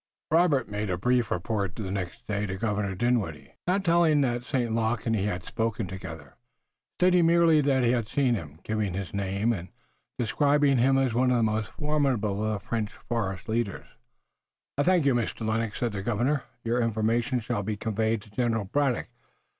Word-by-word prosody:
Robert 160 -7 +3
made 105 0 -3
a 90 - 0
brief 125 +3 +1
report 100 +1 -2
the 100 -4 -4
next 100 +4 -5
day 105 -1 -2
to 95 - -3
Governor 100 -1 -1
Dinwiddie, 110 -8 -1
not 190 +2 +1
telling 165 -3 +4
that 120 -2 0
St. 125 -3 -1
Luc 115 0 0
and 115 -1 +1
he 100 -2 0
had 90 -4 -2
spoken 110 0 -2
together, 80 -6 -9 0.6
stating 180 -2 +4
merely 165 -2 +5
that 135 -2 +2
he 120 - +4
had 120 -3 0
seen 130 0 +2
him, 80 -9 -5
giving 110 -4 -1
his 95 -2 -5
name, 100 +3 0
and 90 -4 -5 0.5
describing 140 +2 +3
him 135 +2 +4
as 130 -3 +1
one 125 +2 +3
of 125 - +3
the 115 - +2
most 110 0 0
formidable 135 -9 0
of 110 -2 -1
the - - -24
French 110 -3 -1 0.2
forest 95 -6 -2
leaders. 110 -3 -2 0.9
"I 145 - +1
thank 175 -1 +3
you, 135 - +4
Mr. 115 -1 -2
Lennox," 110 -1 -1
said 120 -2 0
the 100 -1 -4
Governor. 125 +6 0 0.2
"Your 120 +1 +1
information 115 +2 +1
shall 115 -1 -2
be 105 +1 -3
conveyed 110 0 -1
to 105 - -18
General 115 -2 0
Braddock. 135 +4 0
115 Hz, 185 wpm, -27 LUFS, 105-130 Hz, 0.9 s, merely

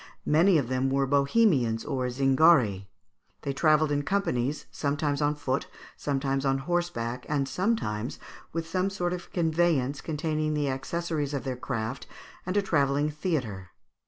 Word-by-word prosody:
Many 170 +4 +5
of 140 -5 0
them 130 +1 0
were 135 0 +2
Bohemians 140 - +2
or 130 -4 -1
Zingari. 130 - +4 0.6
They 140 - -2
travelled 155 0 +3
in 145 0 +1
companies, 145 -7 -1
sometimes 145 0 -1
on 145 0 +2
foot, 135 -2 -2 0.3
sometimes 135 -1 -1
on 135 -1 +2
horseback, 135 -6 -2
and 140 -2 0
sometimes 135 - -1 0.3
with 165 0 -3
some 185 +3 0
sort 180 -2 -2
of 180 - -6
a - - -29
conveyance 160 -5 +1
containing 155 -1 -1
the 145 -2 0
accessories 150 +1 -2
of 140 - -3
their 130 -2 -3
craft 125 0 -4 0.4
and 185 +2 0
a 205 - +3
travelling 145 -3 +1
theatre. 125 - -3
145 Hz, 150 wpm, -28 LUFS, 135-165 Hz, 0.6 s, Many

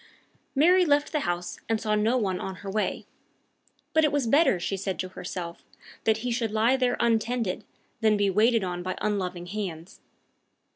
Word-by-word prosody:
Mary 355 +6 +5
left 290 -3 +2
the 305 - +1
house, 175 0 -3
and 225 -1 +1
saw 215 0 -1
no 215 +4 +2
one 190 -6 -1
on 190 - -5
her 195 - -3
way. 215 +1 -1 0.9
But 315 - +4
it 300 - +3
was 290 -3 +1
better, 275 - +4
she 195 - -2
said 195 -1 -3
to 185 - -3
herself, 175 -2 -6 0.4
that 220 -1 +3
he 245 - 0
should 230 -1 0
lie 220 +4 +3
there 250 -2 +1
untended, 230 -3 0 0.3
than 215 -2 +3
be 200 -1 +2
waited 220 +2 +3
on 175 -1 -3
by 185 +1 -4
unloving 185 -4 -2
hands. 180 -2 -6
215 Hz, 180 wpm, -27 LUFS, 185-245 Hz, 0.9 s, Mary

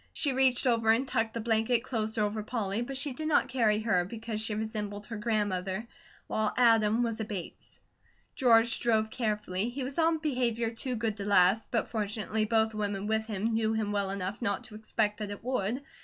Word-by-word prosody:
She 285 -3 +2
reached 260 -1 +3
over 230 -3 +2
and 235 +4 +3
tucked 225 -1 -1
the 230 - -2
blanket 225 +1 +1
closer 220 -3 -1
over 210 +1 -1
Polly, 215 -1 -2
but 265 +2 -3
she 280 0 0
did 310 +4 -4
not 310 - +3
carry 220 -4 +2
her, 190 -6 +2
because 220 +2 -5
she 220 -1 0
resembled 210 -1 -4
her 225 - -7
grandmother, 205 -2 -1 0.4
while 215 -1 -1
Adam 225 -1 +4
was 230 -2 -2
a - - -1
Bates. 200 -5 -8 0.5
George 235 -2 +4
drove 220 -2 +1
carefully. 210 -3 -1
He 260 +2 -5
was 270 +5 -4
on 325 0 +3
behaviour 245 -7 -1
too 245 +2 -3
good 220 -2 -2
to 200 - -5
last, 200 +2 +4
but 230 - -1
fortunately 215 0 -1
both 220 0 +2
women 205 -2 -2
with 220 +1 0
him 220 +1 -1
knew 220 0 +1
him 215 -2 -1
well 200 -1 0
enough 195 +2 -4
not 200 -4 -1
to 220 - -10
expect 215 0 -1
that 210 -1 -4
it 205 0 -8
would. 250 +1 -1
220 Hz, 200 wpm, -30 LUFS, 210-235 Hz, 0.5 s, Adam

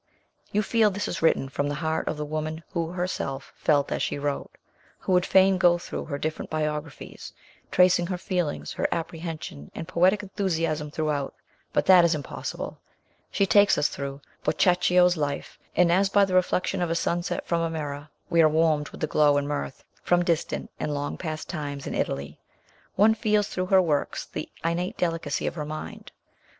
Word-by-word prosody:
You 210 +1 +1
feel 220 0 +3
this 205 +1 -3
is - - -4
written 160 -4 +3
from 145 +2 -2
the 145 - -2
heart 160 +1 -2
of 160 - -2
the 150 - -3
woman 155 +1 -4
who 170 -3 -2
herself 175 -7 -4
felt 145 -2 +1
as - - -1
she - - -1
wrote. 145 0 -2 0.6
We 185 - +1
would 180 0 +3
fain 190 0 +5
go 175 -1 +5
through 170 - -6
her 140 - -4
different 155 +2 -4
biographies, 150 -1 -4 0.4
tracing 180 -1 +4
her 180 -1 -2
feelings, 175 -4 -2
her - - 0
appreciation, 160 - -5
and 165 - -6
poetic 185 +4 +3
enthusiasm 165 -6 -1
throughout, 150 -2 -2 0.4
but - - +1
that 185 -2 +8
is 170 -1 +3
impossible. 145 -3 -6 0.5
She 200 - +1
takes 205 +1 +5
us 145 - +2
through 140 0 -6 0.2
Boccaccio's 180 +2 +3
life, 145 -2 -3 0.2
and, 175 0 +4
as 195 +3 +3
by 200 0 +5
the 190 - -4
reflection 185 +1 +1
of 175 - 0
a 165 - 0
sunset 170 +1 -1
from 170 -1 0
a 165 - 0
mirror, 150 -2 -5 0.2
we 170 - +4
are 155 - +6
warmed 155 -1 +2
with - - -12
the - - +2
glow 150 -1 +3
and 145 0 -1
mirth 70 - -4 0.2
from 175 0 +2
distant 170 -3 -1
and 150 - -2
long 145 0 -3
past 155 -2 -5
times 145 -4 -5
in - - -4
Italy. 70 +2 -3 0.6
One 215 +3 +5
feels 210 -2 +1
through 185 0 -2
her 190 0 +5
works 150 -4 -1
the 155 - -6 0.2
innate 170 +2 -1
delicacy 165 -2 -1
of - - -1
her 150 -3 -4
mind. 155 +1 -7
165 Hz, 185 wpm, -26 LUFS, 150-180 Hz, 0.6 s, that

